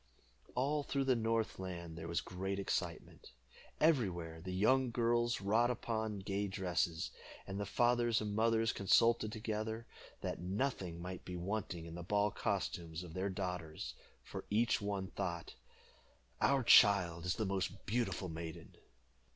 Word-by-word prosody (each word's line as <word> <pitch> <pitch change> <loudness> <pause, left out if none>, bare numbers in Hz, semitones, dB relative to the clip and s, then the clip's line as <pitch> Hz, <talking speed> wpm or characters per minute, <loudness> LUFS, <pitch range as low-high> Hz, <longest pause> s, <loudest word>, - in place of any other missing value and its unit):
All 145 +4 +1
through 140 -1 -1
the 130 -1 +3
north 115 -3 0
land 85 -3 -5
there 80 0 -6
was 85 +1 0
great 95 +2 -3
excitement. 95 -8 -3 0.5
Everywhere 90 - +2
the 95 +2 -5
young 125 +8 +3
girls 120 0 +1
wrought 110 +5 +3
upon 110 -3 -2
gay 100 +1 -2
dresses, 90 -4 -1 0.3
and 95 0 -4
the 100 - -2
fathers 120 0 +3
and 105 -1 -3
mothers 115 0 +3
consulted 110 +2 +4
together, 110 +1 -3 0.4
that - - -3
nothing 95 -3 -2
might 90 0 -6
be 90 - -6
wanting 90 -2 -3
in 85 - -8
the 85 - -6
ball 105 +3 +1
costumes 90 -5 -2
of 85 -3 -9
their 95 +3 -1
daughters, 90 -9 -4 0.3
for - - -6
each 115 +2 +2
one 100 -2 -2
thought 85 -4 -3 0.9
"Our 135 -2 +4
child 90 -7 +6
is 90 - +1
the 110 - -1
most 95 -1 -2
beautiful 115 -4 -1
maiden." 80 -1 -7
100 Hz, 145 wpm, -36 LUFS, 90-115 Hz, 0.9 s, child